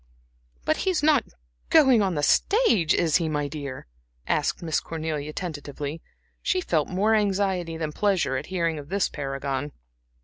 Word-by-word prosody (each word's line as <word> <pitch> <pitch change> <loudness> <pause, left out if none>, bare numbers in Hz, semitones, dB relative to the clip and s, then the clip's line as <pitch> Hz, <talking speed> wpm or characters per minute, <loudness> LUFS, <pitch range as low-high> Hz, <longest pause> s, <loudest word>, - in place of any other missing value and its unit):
"But - - +2
he - - 0
is 355 -5 0
not 300 -4 +4 0.4
going 265 -8 +6
on 190 -4 0
the 145 - -1
stage, 230 - +3
is 160 -3 +3
he, 165 -3 -1
my 145 -1 -1
dear?" 140 -3 -6 0.4
asked - - 0
Miss 160 -2 0
Cornelia, 155 -2 -4
tentatively. 150 -2 -5 0.4
She 370 - +1
felt 165 - 0
more 200 +4 +2
anxiety 190 -5 0
than 155 -2 -3
pleasure 180 -7 +1
at 130 +3 -4
hearing 170 -4 -1
of 145 - -10
this 200 +1 +1
paragon. 135 0 -4
165 Hz, 160 wpm, -25 LUFS, 145-200 Hz, 0.4 s, going